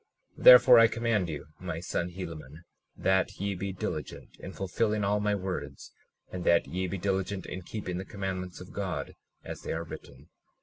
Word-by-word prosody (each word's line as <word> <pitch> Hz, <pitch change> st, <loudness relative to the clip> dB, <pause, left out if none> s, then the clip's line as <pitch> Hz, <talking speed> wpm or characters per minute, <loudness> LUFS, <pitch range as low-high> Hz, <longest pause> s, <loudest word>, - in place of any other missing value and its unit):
37:20 -, -, -9 dB
Therefore 125 Hz, -1 st, +10 dB
I 115 Hz, -, +8 dB
command 115 Hz, -6 st, 0 dB
you, 75 Hz, -2 st, -5 dB
my 90 Hz, -3 st, -4 dB
son 85 Hz, 0 st, -2 dB
Helaman, 85 Hz, -4 st, -8 dB, 0.3 s
that 95 Hz, -1 st, +1 dB
ye 100 Hz, +1 st, -1 dB
be 95 Hz, +1 st, -4 dB
diligent 95 Hz, -, -6 dB
in 95 Hz, -, -8 dB
fulfilling 105 Hz, +3 st, -1 dB
all 100 Hz, +1 st, +1 dB
my 105 Hz, 0 st, +1 dB
words, 90 Hz, -8 st, -5 dB, 0.4 s
and 90 Hz, -1 st, -5 dB
that 85 Hz, -1 st, +4 dB
ye 95 Hz, +1 st, -3 dB
be 95 Hz, +2 st, -3 dB
diligent 95 Hz, 0 st, -2 dB
in 95 Hz, -, -6 dB
keeping 90 Hz, -1 st, -5 dB
the -, -, -4 dB
commandments 95 Hz, -2 st, -5 dB
of 90 Hz, -, -11 dB
God 95 Hz, -3 st, -4 dB, 0.3 s
as -, -, -7 dB
they -, -, -4 dB
are 80 Hz, +1 st, -3 dB
written. 80 Hz, -, -11 dB
95 Hz, 180 wpm, -29 LUFS, 90-100 Hz, 0.4 s, Therefore